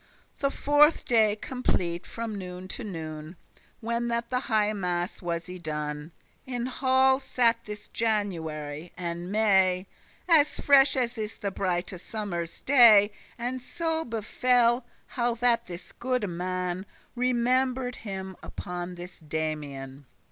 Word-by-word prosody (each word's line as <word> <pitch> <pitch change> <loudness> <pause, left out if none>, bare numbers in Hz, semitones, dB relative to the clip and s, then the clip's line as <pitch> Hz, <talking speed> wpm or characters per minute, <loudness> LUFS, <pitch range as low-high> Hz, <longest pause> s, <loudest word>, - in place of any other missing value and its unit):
The 275 - +2
fourthe 290 +3 +4
day 220 -3 +4
complete 180 -10 -2
from 230 -2 -5
noon 180 -1 -7
to 245 - -4
noon, 160 -4 -6 0.5
When 235 +1 -1
that 235 +1 -2
the 250 - +2
highe 215 -4 +1
masse 180 0 -2
was 170 -1 -3
y 180 0 -7
done, 150 -1 -4 0.4
In 245 -2 -2
halle 260 +1 +3
sat 235 -3 +1
this 210 0 -8
January, 165 -8 -2
and 175 +1 -4
May, 190 -3 +3 0.4
As 310 -4 +4
fresh 280 0 +5
as 245 -2 -1
is 215 0 -4
the 200 - -3
brighte 185 -1 -2
summer's 175 -6 -5
day. 225 -6 +7 0.3
And 250 +2 -3
so 325 +3 -2
befell, 240 +1 +2 0.2
how 240 -1 -1
that 235 -1 +2
this 175 0 -9
goode 250 -3 -1
man 180 +1 -3 0.3
Remember'd 250 +1 +1
him 190 -3 -6
upon 180 0 -6
this 175 +1 -10
Damian. 145 -4 -5
210 Hz, 130 wpm, -27 LUFS, 175-245 Hz, 0.5 s, day